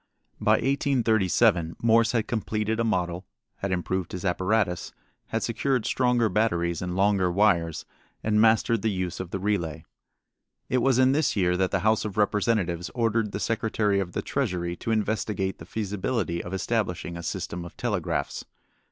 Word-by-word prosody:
By - - +3
1837 115 - +2
Morse 115 0 +3
had 115 -2 0
completed 110 -1 -1
a - - +2
model, 90 -5 -1 0.3
had 100 - -3
improved 95 0 -2
his 90 +1 -5
apparatus, 95 0 0 0.4
had 115 - -2
secured 125 +1 0
stronger 125 -2 +2
batteries 85 -5 0
and 90 0 -3
longer 95 -2 +2
wires, 85 -4 +2 0.4
and 105 0 +2
mastered 115 0 +3
the 110 - +1
use 95 -3 -3
of 95 - -5
the 95 - -3
relay. 95 -6 -2 0.8
It 130 - +2
was 130 0 +3
in 130 0 +5
this 150 +2 +1
year 90 -3 +2
that 95 0 +1
the 95 - 0
House 110 +2 +2
of 105 -2 -5
Representatives 100 -4 +1
ordered 115 -3 +1
the 100 - -4
Secretary 110 -2 0
of 90 -3 -3
the - - -2
Treasury 90 -10 -2
to - - -5
investigate 105 -3 -1
the 80 - -9
feasibility 105 -3 -2
of 90 - -7
establishing 95 -3 -2
a 85 - -6
system 85 +1 -4
of 85 - -11
telegraphs. - - -2
105 Hz, 160 wpm, -26 LUFS, 90-115 Hz, 0.8 s, in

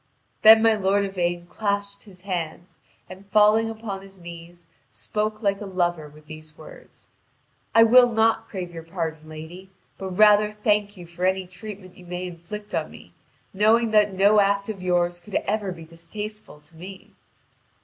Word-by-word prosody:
Then 220 +1 +8
my 225 0 +5
lord 200 -1 +1
Yvain 175 -2 -2
clasped 200 +1 -3
his 185 -3 -15
hands, 175 -2 -5 0.3
and 190 +2 -12
failing 215 +2 +4
upon 220 -3 -6
his 195 0 -15
knees, 170 0 -12 0.2
spoke 215 +1 -4
like 200 0 0
a 205 - -6
lover 175 -4 -1
with 150 +1 -18
these 155 0 -10
words: - - -14 0.7
"I 225 - +8
will 245 +1 +6
not 225 0 +2
crave 185 -5 -6
your 165 - -7
pardon, 160 -2 -5
lady, 160 +5 -10 0.3
but 190 - -5
rather 210 0 +5
thank 210 -1 0
you 175 - -10
for 170 +1 -9
any 190 0 +1
treatment 185 0 -10
you 180 - -15
may 180 +1 -5
inflict 180 +4 -9
on 155 - -2
me, - - -15 0.4
knowing 220 +3 +3
that 210 -1 +4
no 200 +2 +5
act 200 +1 +1
of 200 -4 -6
yours 175 -1 0
could 195 +4 -10
ever 210 -3 -1
be 165 -2 -10
distasteful 205 +3 -9
to 150 +2 -16
me." 185 +3 -11
195 Hz, 170 wpm, -24 LUFS, 175-210 Hz, 0.7 s, Then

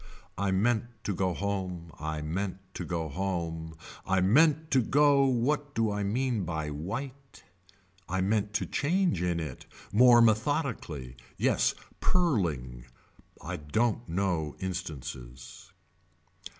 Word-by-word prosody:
I 100 +1 0
meant 110 +5 +2 0.2
to 100 - -1
go 95 0 0
home. 95 -4 -3
I 80 0 -3
meant 95 +5 -2 0.2
to - - -5
go 85 -2 -2
home. 80 -1 -3 0.3
I 95 0 +1
meant 155 - +4
to 130 - +5
go 140 +3 +4
what 140 +3 0
do 115 -2 +2
I 105 0 -2
mean 115 +1 0
by 80 -3 -3
white. 130 - -6 0.7
I 95 +1 0
meant 105 +2 +1
to 110 - 0
change 170 - +1
in 90 -1 0
it. 75 -6 -6 0.2
More 120 +3 +7
methodically. 110 - +1 0.2
Yes - - +2 0.2
purling. 80 - 0 0.6
I - - -4
don't 110 +8 0
know 85 -4 -1
instances. 70 -10 -6
95 Hz, 125 wpm, -29 LUFS, 80-120 Hz, 0.7 s, More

